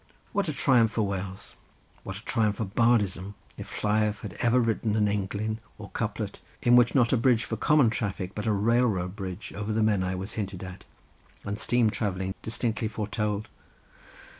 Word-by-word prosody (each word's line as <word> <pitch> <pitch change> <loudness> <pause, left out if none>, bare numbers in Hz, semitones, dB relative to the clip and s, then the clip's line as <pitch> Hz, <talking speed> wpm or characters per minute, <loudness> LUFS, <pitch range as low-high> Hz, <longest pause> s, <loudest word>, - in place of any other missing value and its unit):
What 195 -4 +1
a - - +1
triumph 125 -5 +3
for 110 - +1
Wales; 95 0 -5 0.4
what 95 0 -6
a 105 - -13
triumph 105 -2 +1
for 110 - -2
bardism, 100 -2 +1 0.2
if - - -8
Lleiaf 105 -1 +1
had - - -6
ever 120 +1 +3
written 115 -2 +1
an 105 -1 +3
englyn, 105 +2 -1 0.2
or - - -10
couplet, - - -3 0.2
in 120 0 +5
which 120 +1 +5
not 120 -3 +4
a - - +4
bridge 120 0 +3
for - - -3
common 145 -7 +4
traffic, 100 -4 -3
but 105 +1 -4
a - - +3
railroad 105 -3 +2
bridge 95 -1 -6
over 105 +1 -3
the 110 +1 +1
Menai 95 -4 +1
was 95 +3 -5
hinted 100 -3 -4
at, 95 0 -9 0.6
and 100 +1 -3
steam 120 -3 +2
travelling 95 -3 -2
distinctly 110 0 -1
foretold! 105 0 -2
105 Hz, 175 wpm, -27 LUFS, 100-115 Hz, 0.6 s, in